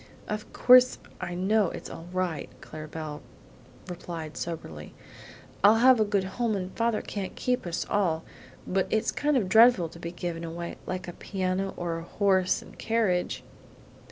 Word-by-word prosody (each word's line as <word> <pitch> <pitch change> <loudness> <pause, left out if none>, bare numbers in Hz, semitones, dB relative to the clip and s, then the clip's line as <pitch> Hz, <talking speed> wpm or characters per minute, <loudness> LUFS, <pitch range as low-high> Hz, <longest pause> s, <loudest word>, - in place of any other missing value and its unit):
"Of 210 0 -4
course 255 0 +6 0.2
I 175 - -4
know 195 +1 +2
it's - - -7
all 165 - -9
right," 180 -4 -2
Clara 155 0 -9
Belle 150 -1 -6 0.7
replied 170 -3 -6
soberly. 80 - -6 0.7
"I'll 205 +2 +8
have 250 +1 +6
a - - +5
good 205 -2 +1
home 215 +3 -1
and 185 -1 -4
father 230 -1 0
can't 195 -3 -5
keep 250 -7 -1
us 170 - -2
all; 170 -6 +1 0.4
but 190 0 0
it's 220 - +1
kind 295 -1 +1
of 210 -7 +1
dreadful 220 -4 +6
to 170 - -13
be 170 0 -5
given 175 -1 -4
away, 170 +1 -5
like 185 -1 -4
a 175 - -6
piano 190 0 -2
or 170 -1 -2
a - - -8
horse 190 0 +1
and - - -16
carriage!" 220 -6 0
185 Hz, 165 wpm, -28 LUFS, 170-215 Hz, 0.7 s, I'll